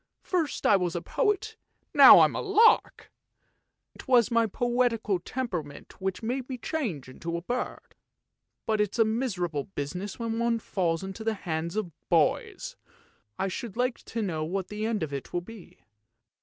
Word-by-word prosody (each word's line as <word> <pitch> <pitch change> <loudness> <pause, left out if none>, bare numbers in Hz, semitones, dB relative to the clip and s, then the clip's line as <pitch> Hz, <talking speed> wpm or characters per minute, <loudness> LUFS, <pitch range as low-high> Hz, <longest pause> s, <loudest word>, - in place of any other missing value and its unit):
First 330 -6 -1
I 205 - +6
was 180 -2 -2
a 175 - -2
poet, 435 0 -1 0.4
now - - +10
I - - +8
am - - -2
a - - -2
lark! 430 +3 +3 0.8
It - - -13
was 245 -4 +4
my 230 -1 +3
poetical 235 -3 0
temperament 175 - -6
which 190 +3 -3
made 250 +3 -3
me 260 - -4
change 225 - -3
into 170 +6 -5
a 170 - -7
bird; 245 +5 -4 0.7
but 215 -1 +1
it's 210 +1 -1
a 225 - +5
miserable 185 - -2
business 180 +4 -5
when 230 -1 -3
one 235 0 +1
falls 175 -6 -1
into 195 +3 -6
the 220 0 0
hands 170 -2 -4
of 210 -5 -2 0.2
boys. - - +1 0.6
I 195 - -1
should 230 +1 -6
like 250 0 0
to 225 -1 -3
know 160 -6 -2
what 185 +4 -3
the 210 +1 -3
end 220 -6 -1
of 145 -2 -5
it 135 -4 -6
will 175 - 0
be." 210 +1 -13
215 Hz, 170 wpm, -27 LUFS, 175-240 Hz, 0.8 s, now